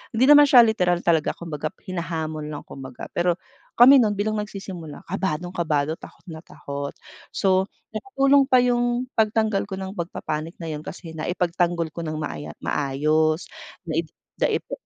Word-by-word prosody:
Hindi 240 - +3
naman 290 0 +9
siya 245 -3 +8
literal 180 -6 +1
talaga. 165 -3 +2
Kumbaga 155 -3 -5 0.2
hinahamon 160 -4 -4
lang 150 -1 -6
kumbaga. 130 -2 -9
Pero 175 0 +1 0.4
kami 260 +3 +8
nun 210 -3 +2
bilang 215 +1 -1
nagsisimula, 190 -7 -7
kabadong-kado, 165 -4 -2
takot - - -14
na 160 - -7
takot. 140 -3 -7 0.4
So, 190 0 +2 0.2
nakatulong 275 - +3
pa 255 -2 +5
yung 245 +1 +1
pagtanggal 215 -2 +1
ko 195 - -5
ng 190 0 -5
pagpa-panic 165 -1 -4
na 160 - -4
yun 150 - -4
kasi 170 -2 -8
naipagtanggol 170 0 -1
ko 170 - -8
nang 155 - -3
maaya 145 - -6
maayos. 155 +4 0 0.3
Nai 165 -1 -2 0.3
daipa - - 0
175 Hz, 145 wpm, -24 LUFS, 155-215 Hz, 0.4 s, naman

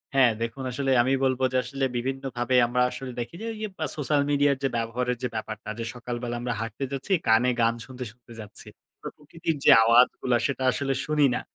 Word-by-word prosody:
হ্যাঁ। 130 -4 +6
দেখুন, 115 +3 -4
আসলে 135 +1 -1
আমি 130 +2 +1
বলব 130 -1 +1
যে - - +3
আসলে 135 +1 -2
বিভিন্নভাবে 130 0 -2
আমরা 125 +1 0
আসলে 135 -1 -6
দেখি 120 +8 -5
যে, - - -5
ওই - - -9
যে 215 - -2 0.2
আ - - +1
সোশ্যাল 145 0 +1
মিডিয়ার 145 -1 +3
যে - - +3
ব্যবহারের 120 +2 -2
যে - - +1
ব্যাপারটা, 110 -1 -5
যে 115 - -3
সকালবেলা 120 0 -5
আমরা 120 -1 -2
হাঁটতে 115 +4 -5
যাচ্ছি, 135 +7 -5 0.2
কানে 115 +3 +4
গান 115 0 +3
শুনতে, 130 -1 -8
শুনতে 120 0 -17
যাচ্ছি। 105 -1 -10 0.3
প্রকৃতির 160 +1 -5
যে - - +8
আওয়াজগুলা 120 +1 +4
সেটা 135 -1 -3
আসলে 135 0 -1
শুনি 150 -1 +3
না। - - -2
125 Hz, 200 wpm, -26 LUFS, 120-135 Hz, 0.3 s, যে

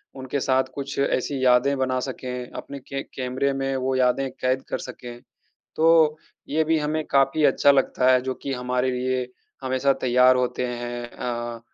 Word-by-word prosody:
उनके 130 +1 -3
साथ 130 0 +2
कुछ 140 0 -5
ऐसी 135 0 0
यादें 125 +3 +4
बना 130 -1 0
सकें, 125 -1 -5
अपने 140 0 -8
के 135 +1 -6
कैमरे 130 +2 -2
में 135 0 -2
वो 130 0 -1
यादें 130 +1 +2
कैद 130 0 -1
कर - - -1
सकें, 120 -1 -9 0.6
तो 160 -1 +4 0.3
ये 155 +2 +1
भी 160 0 +2
हमें 150 +1 -1
काफ़ी 135 +3 +2
अच्छा 145 - +5
लगता 130 -2 +3
है 125 - +4
जो 130 0 -3
कि 140 - -3
हमारे 125 0 -1
लिए 125 0 -1 0.4
हमेशा 130 +1 +1
तैयार 125 0 +5
होते 125 0 -1
हैं 120 0 -5
अ, 120 -1 -5
130 Hz, 170 wpm, -24 LUFS, 125-140 Hz, 0.6 s, अच्छा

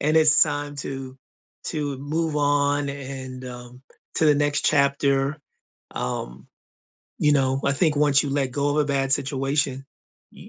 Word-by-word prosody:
and 155 +2 +1
it's 155 -1 +7
time 145 -1 -1
to 135 -1 -6 0.5
to 145 -4 -3
move 155 +3 -2
on 145 0 +1
and, 130 -2 -7
um, 125 0 -10 0.3
to 160 - +1
the 150 - +5
next 145 0 0
chapter. 140 0 +2 0.6
Um, 60 0 -5 0.7
you 150 - +3
know, 135 -1 +1
I 140 - +2
think 150 +1 +1
once 145 -1 +4
you 145 - -3
let 135 -2 -1
go 145 +2 0
of 145 - -1
a 150 - +3
bad 135 -1 0
situation, 135 0 0 0.5
y - - -14
140 Hz, 155 wpm, -23 LUFS, 135-145 Hz, 0.7 s, it's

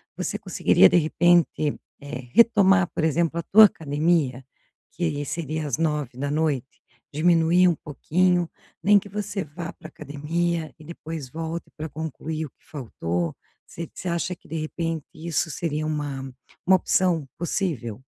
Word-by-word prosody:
você - - -3
conseguiria, - - +4
de - - +1
repente, 170 -2 +3 0.3
eh, 135 -4 -7
retomar, 200 -5 +5
por - - 0
exemplo, 165 +1 +1
a 170 - -2
tua 215 +5 +8
academia, 150 -6 0 0.5
que 150 -4 -2
seria 155 +1 -3
às 130 - -1
21h? 145 -2 -1 0.3
Diminuir 170 +3 +4
um 175 - +3
pouquinho. 175 +4 0 0.3
Nem 205 +1 +6
que 200 - -12
você 200 -1 -3
vá 160 +3 -7
para 155 - -12
a - - -13
academia 160 +2 -3
e - - -13
depois 160 -3 -7
volte 165 +3 -5
para 155 +1 -5
concluir 160 +1 -4
o 145 - -10
que - - -38
faltou. 90 - -3 0.3
Você 170 0 -8
você 185 - -7
acha 170 +1 -1
que, - - -22
de 165 - -6
repente, 160 0 -3
isso 160 0 -2
seria 155 -1 -2
uma 145 -3 -3 0.4
uma 190 - +6
opção 180 -5 +1
possível? 150 - -2
160 Hz, 150 wpm, -24 LUFS, 145-170 Hz, 0.5 s, tua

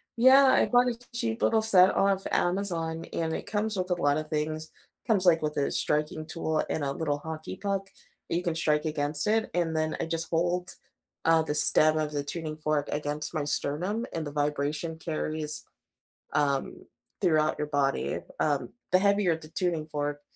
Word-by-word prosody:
Yeah, 260 +3 +7
I 260 - +4
bought 245 0 +4
a 235 - -4 0.2
cheap 230 -1 -2
little 220 -1 +3
set 190 -4 +5
off 195 -1 +2
Amazon 170 -3 -1
and 160 -1 -1
it - - -5
comes 215 0 -1
with 185 0 -2
a 180 - +2
lot 145 -4 +2
of 155 0 -4
things; 155 +1 -2 0.4
comes, 205 -5 +2
like, 170 -2 +5
with 150 -1 -2
a 140 - +1
striking 150 +1 -1
tool 160 -1 -1
and 150 - -1
a 140 - -1
little 145 -1 -1
hockey 160 +1 -6
puck 195 -1 -2 0.4
that - - 0
you 175 - 0
can 170 -3 -1
strike 150 -1 +1
against 150 +1 -1
it, 220 +1 +2
and 165 -2 0
then 155 0 0
I - - -1
just 165 0 -3
hold, 175 +2 0 0.5
uh, 165 0 +5
the 150 -1 -2
stem 155 +1 +4
of 155 -1 -1
the 145 -1 -2
tuning 155 +1 -5
fork 150 -1 -1
against 150 +1 -3
my 155 -3 -1
sternum 180 +11 -1
and 165 -1 -3
the - - -5
vibration 150 +2 -1
carries, 155 -2 -3 0.7
um, 140 -2 -1 0.3
throughout 155 -4 +2
your 150 - -1
body, 140 -2 0 0.2
um, 145 -2 0 0.2
the 185 - +7
heavier 200 -3 +3
the 155 -1 -12
tuning 165 -2 -1
fork, 145 -1 -3
160 Hz, 185 wpm, -28 LUFS, 150-180 Hz, 0.7 s, Yeah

